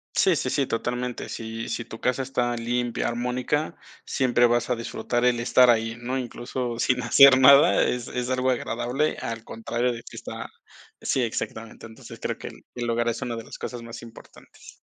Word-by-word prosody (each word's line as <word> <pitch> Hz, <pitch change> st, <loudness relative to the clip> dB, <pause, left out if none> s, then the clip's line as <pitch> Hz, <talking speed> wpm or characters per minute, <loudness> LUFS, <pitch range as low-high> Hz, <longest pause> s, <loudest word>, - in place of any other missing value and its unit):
Sí, -, -, +4 dB
sí, -, -, -1 dB
sí, 140 Hz, -, +1 dB
totalmente. 125 Hz, +1 st, -3 dB
Si 115 Hz, 0 st, -6 dB
si 120 Hz, -, -3 dB
tu 110 Hz, -, -10 dB
casa 125 Hz, +1 st, 0 dB
está 125 Hz, -2 st, -1 dB
limpia, 120 Hz, 0 st, -1 dB
armónica, 125 Hz, +5 st, -2 dB, 0.3 s
siempre 120 Hz, -2 st, +3 dB
vas 120 Hz, +1 st, +1 dB
a 125 Hz, -, +2 dB
disfrutar 120 Hz, +1 st, -2 dB
el 120 Hz, -1 st, +3 dB
estar 125 Hz, +1 st, +5 dB
ahí, 115 Hz, 0 st, +2 dB
¿no? 130 Hz, +2 st, -2 dB
Incluso, 120 Hz, -1 st, -4 dB
sin 125 Hz, +1 st, +1 dB
hacer 140 Hz, -2 st, +8 dB
nada, 140 Hz, +2 st, +7 dB
es 125 Hz, -1 st, -1 dB
es 125 Hz, 0 st, -3 dB
algo 130 Hz, 0 st, +1 dB
agradable, 125 Hz, +4 st, -1 dB
al 115 Hz, 0 st, -5 dB
contrario 120 Hz, +2 st, -2 dB
de 115 Hz, -, -7 dB
que -, -, -11 dB
está -, -, -7 dB, 0.5 s
sí, 130 Hz, -, 0 dB
exactamente. 115 Hz, -1 st, -4 dB
Entonces, 110 Hz, 0 st, -12 dB
creo -, -, -2 dB
que -, -, -8 dB
el -, -, -12 dB
el 120 Hz, -1 st, -3 dB
hogar 120 Hz, 0 st, 0 dB
es 115 Hz, 0 st, -1 dB
una 120 Hz, -2 st, -3 dB
de 115 Hz, -, -6 dB
las -, -, -10 dB
cosas 120 Hz, -2 st, -6 dB
más 115 Hz, 0 st, -9 dB
importantes. 115 Hz, -1 st, -15 dB
120 Hz, 190 wpm, -25 LUFS, 115-125 Hz, 0.5 s, hacer